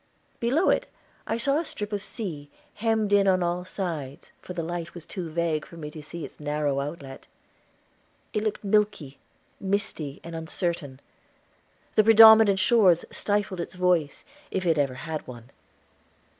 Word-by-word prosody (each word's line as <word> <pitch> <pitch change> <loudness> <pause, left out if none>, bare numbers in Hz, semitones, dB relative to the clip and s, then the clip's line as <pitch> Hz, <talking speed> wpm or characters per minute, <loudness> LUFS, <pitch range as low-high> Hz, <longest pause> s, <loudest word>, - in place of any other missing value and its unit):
Below 270 +10 +2
it - - 0 0.4
I 225 - -1
saw 275 +5 +1
a - - -2
strip 210 -9 -5
of 205 - 0
the - - -9
sea, 160 - -6 0.2
hemmed 220 -2 0
in 200 -1 +5
on 185 -1 +3
all 175 +1 -1
sides, 160 -8 -5
for 180 - -8
the 170 -2 -3
light 170 +1 -5
was 170 -3 -9
too 180 -4 -6
vague 160 -1 -1
for 170 - -13
me 150 -2 -7
to 155 - -9
see 160 +2 -7
its - - -14
narrow 145 -1 -1
outlet. 140 -2 -7 1.1
It 210 - -1
looked 215 -1 -2
milky, 205 -9 0 0.4
misty, 190 -7 -3
and 170 0 -8
uncertain; 160 -4 -3 0.9
the 215 - +5
predominant 220 -2 +8
shores 190 -3 +4
stifled 205 -3 -1
its 170 - -7
voice, 180 -5 +1 0.2
if 185 -1 -2
it 165 -3 +2
ever 135 -3 0
had 155 +4 -6
one. 120 0 -11
175 Hz, 160 wpm, -26 LUFS, 150-205 Hz, 1.1 s, predominant